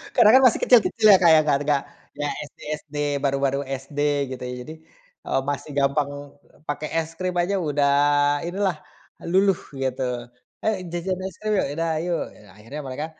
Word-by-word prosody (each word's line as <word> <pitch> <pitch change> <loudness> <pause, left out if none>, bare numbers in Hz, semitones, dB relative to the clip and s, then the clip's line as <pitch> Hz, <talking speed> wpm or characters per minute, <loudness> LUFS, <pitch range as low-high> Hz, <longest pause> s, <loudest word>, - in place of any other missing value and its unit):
karena 210 - +7
kan - - +2
masih 235 - +1
kecil-kecil 225 -2 +4
ya 190 - +8
Kak, 170 -3 +6
ya - - +7
gak 145 -2 +2
gak 140 -2 +2 0.3
ya 145 0 -2 0.2
SD - - -28 0.2
SD, 150 -1 -16 0.2
baru-baru 140 0 0
SD 135 +2 -6 0.4
gitu 125 - -10
ya 125 0 -5
jadi, 155 - -9 0.5
eee, 135 - +1
masih 145 +1 -3
gampang 140 0 -1 0.3
pakai 150 0 -4
es 165 0 -1
krim 185 -1 -2
aja 175 +3 +1
udah 145 -3 +1 0.6
inilah 185 -3 -1 0.5
luluh 195 -1 +3 0.2
gitu, 130 -1 -2 0.6
"Ayo 220 -1 +1 0.2
jajan 180 +2 -2
es 185 - -10
krim 215 0 -1
yuk," - - +1
"Ya 140 - -5
udah 165 0 -1
ayo." 175 +1 -2 0.2
Ya 105 - -18
akhirnya 115 +8 -8
mereka, 135 +3 -4
150 Hz, 175 wpm, -23 LUFS, 140-180 Hz, 0.6 s, ya